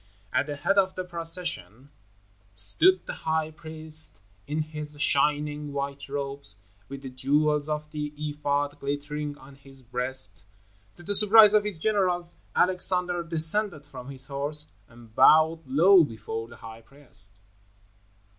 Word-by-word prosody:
At 140 - 0
the 145 - -5
head 195 +7 +1
of 190 -1 0
the 185 - -4
procession 170 - -5 0.6
stood 105 - +4
the - - -6 0.2
high 160 0 -1
priest 155 -1 0 0.3
in 155 +2 -2
his 150 -1 -9
shining 150 0 0
white 140 0 -5
robes, 140 -6 -2 0.3
with 140 0 -9
the 130 - -8
jewels 150 +3 0
of 150 0 -5
the 150 -1 -5
ephod 145 -1 -3
glittering 145 +1 -5
on 135 +1 -16
his 135 -1 -18
breast. 125 -6 0 0.5
To 175 - -16
the 205 - -3
surprise 210 +1 +7
of 210 -1 +3
his 205 -5 -5
generals, 180 -2 -1 0.2
Alexander 180 -1 +1
descended 165 0 +4
from 135 -2 -11
his 135 -1 0
horse 145 +2 0 0.2
and 115 -1 -18
bowed 160 +5 +4
low 170 +7 +5
before 115 -3 -6
the 120 - -15
high 115 0 -12
priest. 110 -6 -1
150 Hz, 140 wpm, -25 LUFS, 135-165 Hz, 0.6 s, surprise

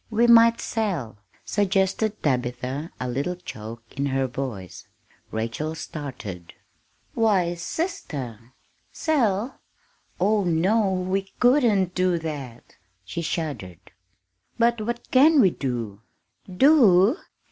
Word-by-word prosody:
"We 230 +1 +2
might 230 0 +6
sell," 175 - -3 0.3
suggested 205 +2 0
Tabitha, 125 +2 -2
a 125 - -3
little 140 +9 -2
choke 115 -9 -9
in 140 0 -1
her 135 0 0
voice. 120 -8 -6 0.4
Rachel 115 +8 -3
started. 120 - -8 0.6
"Why, 195 -7 +2
sister! 140 - -5 0.4
sell? 240 -7 0 0.6
Oh, 205 +3 +2
no, 190 +5 +2
we 190 +1 -2
couldn't 235 -8 +3
do 180 -1 +1
that!" 145 -7 -7 0.3
she 170 - -4
shuddered. 140 - -5 0.7
"But 235 -1 +2
what 235 +2 -5
can 295 +4 +6
we 195 -8 +5
do?" 115 -8 -4 0.5
"Do? 225 - +5
175 Hz, 105 wpm, -24 LUFS, -, 0.7 s, might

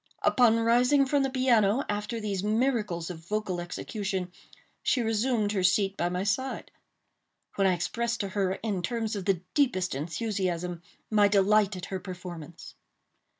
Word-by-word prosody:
Upon 230 -3 +4
rising 245 +5 +4
from 280 +1 +2
the 270 - +1
piano 255 -2 +3
after 210 +3 -3
these 200 -3 -3
miracles 210 -6 0
of 165 - -8
vocal 185 0 -3
execution, 190 +1 -4 0.5
she 250 - +1
resumed 225 -1 +1
her 200 -3 0
seat 195 +2 +2
by 175 -1 0
my 180 +1 -2
side; 260 +6 -2 0.8
when 195 -1 +2
I 185 - +3
expressed 235 +7 -2
to 200 - -3
her, 190 -1 0
in 205 -5 -1
terms 225 +3 -2
of 195 -3 -4
the 195 -4 +1
deepest 235 -11 +1
enthusiasm, 175 - -2 0.3
my 210 -1 +5
delight 205 0 +3
at 185 0 -6
her 190 - -1
performance. 175 -3 -9
205 Hz, 150 wpm, -28 LUFS, 185-230 Hz, 0.8 s, my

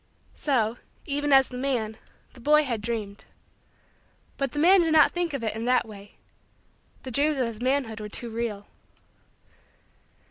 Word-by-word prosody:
So, 240 -5 0 0.3
even 290 0 -2
as 270 -1 +6
the 250 - -7
man, 240 -5 -1 0.4
the - - -15
boy 300 +5 +4
had 235 -6 -3
dreamed. 210 -3 -4 1.1
But 275 -3 -2
the - - -7
man 360 +5 +6
did 325 -2 +1
not 310 -1 +6
think 350 -2 -2
of 255 - -5
it 220 -1 -2
in 225 +1 -4
that 250 -1 +2
way 205 -1 -13 0.9
the 260 - -7
dreams 290 +4 +1
of 255 - +1
his 230 -1 -6
manhood 255 -4 0
were 210 0 -6
too 235 +2 -6
real. 220 -3 -4
250 Hz, 165 wpm, -26 LUFS, 220-285 Hz, 1.1 s, as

